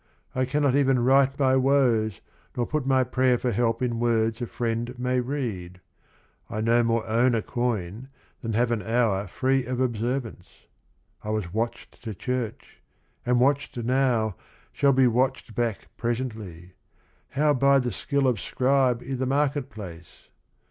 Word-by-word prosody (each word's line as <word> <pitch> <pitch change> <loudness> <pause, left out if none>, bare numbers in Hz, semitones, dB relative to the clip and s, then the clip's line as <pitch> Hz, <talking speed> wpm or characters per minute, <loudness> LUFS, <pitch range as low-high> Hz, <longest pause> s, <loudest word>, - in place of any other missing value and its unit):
I 130 0 +1
cannot 140 0 +1
even 135 -3 +3
write 135 +1 +4
my 130 -2 +3
woes, 125 -7 +2 0.4
nor 120 - +1
put 150 -1 -2
My 130 -1 +4
prayer 130 0 +2
for 125 +1 -1
help 115 +2 0
in 120 -2 -1
words 115 -1 +1
a 120 - -2
friend 120 +2 -3
may 125 +1 0
read, 115 -10 -4 0.4
— - - -37
I 110 - -4
no 115 +2 +3
more 115 -1 0
own 120 +2 +2
a 110 - -1
coin 120 -1 -3 0.3
than 115 -2 -3
have 120 +2 +1
an 115 -2 0
hour 110 -4 +1
Free 135 0 +1
of 125 0 -2
observance, 120 -4 -2 0.4
— - - -39
I 105 - -5
was 105 -5 -2
watched 115 +2 -4
to 110 -3 -5
church, 125 0 -4 0.5
Am 125 0 +3
watched 140 +2 +1
now, 120 -4 +1 0.4
shall 140 -1 +3
be 130 -1 +4
watched 125 0 0
back 115 -2 -2
presently, 110 -8 -4 0.3
— - - -38
How 150 0 +4
buy 140 +1 +4
the 125 -2 0
skill 140 -1 -1
of 120 -5 +1
scribe 130 -1 +1
i' 135 - -3
the 130 0 -1
market 140 0 0
place? 85 -6 -11
120 Hz, 165 wpm, -25 LUFS, 115-130 Hz, 0.5 s, write